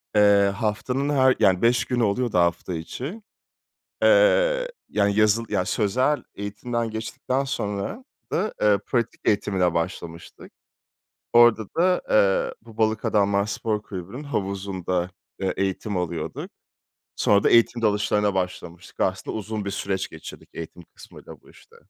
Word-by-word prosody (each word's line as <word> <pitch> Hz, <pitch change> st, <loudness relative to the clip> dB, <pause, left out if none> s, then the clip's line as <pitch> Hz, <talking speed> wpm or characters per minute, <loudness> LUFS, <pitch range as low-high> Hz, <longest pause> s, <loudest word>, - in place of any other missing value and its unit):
Eee, 100 Hz, -1 st, +5 dB
haftanın 125 Hz, +6 st, -1 dB
her 130 Hz, -2 st, +4 dB
yani, 95 Hz, -2 st, +3 dB
5 120 Hz, +1 st, +3 dB
günü 120 Hz, -2 st, 0 dB
oluyordu 110 Hz, 0 st, 0 dB
hafta 85 Hz, +1 st, +1 dB
içi. 130 Hz, -, -6 dB, 0.8 s
Eee, -, -, +4 dB, 0.2 s
yani, 100 Hz, -1 st, +1 dB
yazılı 110 Hz, +2 st, +3 dB
yani, 90 Hz, -3 st, +1 dB
sözel 130 Hz, +8 st, +1 dB
eğitimden 115 Hz, +3 st, -3 dB
geçtikten 125 Hz, +4 st, -3 dB
sonra 105 Hz, -, -4 dB, 0.3 s
da, 210 Hz, +5 st, -1 dB
eee, 105 Hz, -1 st, +4 dB
pratik 120 Hz, -3 st, -1 dB
eğitimine 95 Hz, -4 st, +1 dB
başlamıştık. 85 Hz, -1 st, -5 dB, 0.8 s
Orada 120 Hz, -2 st, +6 dB
da, 180 Hz, +1 st, +3 dB
eee, 100 Hz, -2 st, +3 dB
bu 115 Hz, -1 st, -16 dB
Balık 110 Hz, 0 st, +1 dB
Adamlar 100 Hz, -1 st, +2 dB
Spor 105 Hz, 0 st, -2 dB
Kulübü'nün 100 Hz, +7 st, -8 dB
havuzunda, 95 Hz, -6 st, -2 dB, 0.3 s
eee, 95 Hz, -1 st, -1 dB
eğitim 95 Hz, +1 st, -2 dB
alıyorduk. 85 Hz, -2 st, -4 dB, 0.7 s
Sonra 100 Hz, -1 st, +3 dB
da -, -, +4 dB
eğitim 115 Hz, 0 st, +4 dB
dalışlarına 105 Hz, -1 st, +1 dB
başlamıştık. 90 Hz, -1 st, -5 dB
Aslında -, -, -1 dB
uzun 110 Hz, 0 st, -4 dB
bir 100 Hz, -, -3 dB
süreç 100 Hz, -1 st, -2 dB
geçirdik 80 Hz, -, -11 dB
eğitim 85 Hz, +1 st, -8 dB
kısmıyla -, -, -13 dB
bu -, -, -20 dB
işte. -, -, -20 dB
105 Hz, 130 wpm, -24 LUFS, 95-120 Hz, 0.8 s, Orada